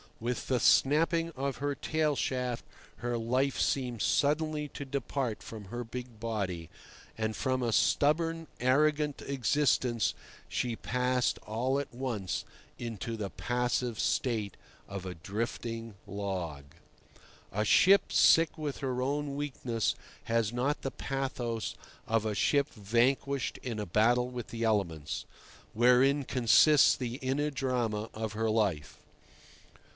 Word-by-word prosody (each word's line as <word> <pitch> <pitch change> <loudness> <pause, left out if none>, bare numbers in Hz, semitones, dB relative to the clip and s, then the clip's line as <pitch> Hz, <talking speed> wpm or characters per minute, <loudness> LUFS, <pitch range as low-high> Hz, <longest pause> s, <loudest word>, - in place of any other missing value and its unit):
With 120 +2 -3
the 130 -2 +2
snapping 165 +7 +4
of 135 -3 -3
her 145 +2 -1
tail 155 0 0
shaft 125 -3 -2 0.3
her 120 0 -2
life 130 +4 0
seemed 125 -5 0
suddenly 150 +1 +1
to 145 - -7
depart 135 -3 -2
from 110 -2 -9
her 120 +5 -5
big 120 -1 -8
body, 100 -8 -3 0.5
and 110 0 -1
from 130 +2 0
a 120 - +1
stubborn, 165 +7 +2
arrogant 150 +3 +2
existence 130 -3 +1 0.3
she 120 -2 -1
passed 125 +1 0
all 125 +6 -1
at 140 - -5
once 110 -9 -3 0.3
into 115 -1 -4
the 105 -3 -4
passive 120 +5 -1
state 110 -7 0 0.3
of 100 -2 -6
a 90 -1 -5
drifting 115 +4 -4
log. 95 -8 -4 0.9
A 105 +3 0
ship 195 - +5
sick 165 0 +5
with 150 -3 -3
her 130 -2 -2
own 140 +1 -1
weakness 130 -6 -1 0.3
has 115 -1 +1
not 130 +5 0
the 135 - -3
pathos 125 -4 -3 0.3
of 110 -1 +1
a 105 -1 -1
ship 140 +7 +2
vanquished 125 +6 0
in 115 -4 -4
a 105 - -2
battle 120 +7 +3
with 125 -2 -6
the 115 0 -4
elements, 90 -9 -1 0.5
wherein 125 +4 +4
consists 135 +5 +5
the 125 -4 -4
inner 135 +3 0
drama 120 -5 -1
of 110 -1 -4
her 110 +1 0
life. 100 -9 0
125 Hz, 130 wpm, -31 LUFS, 110-140 Hz, 0.9 s, ship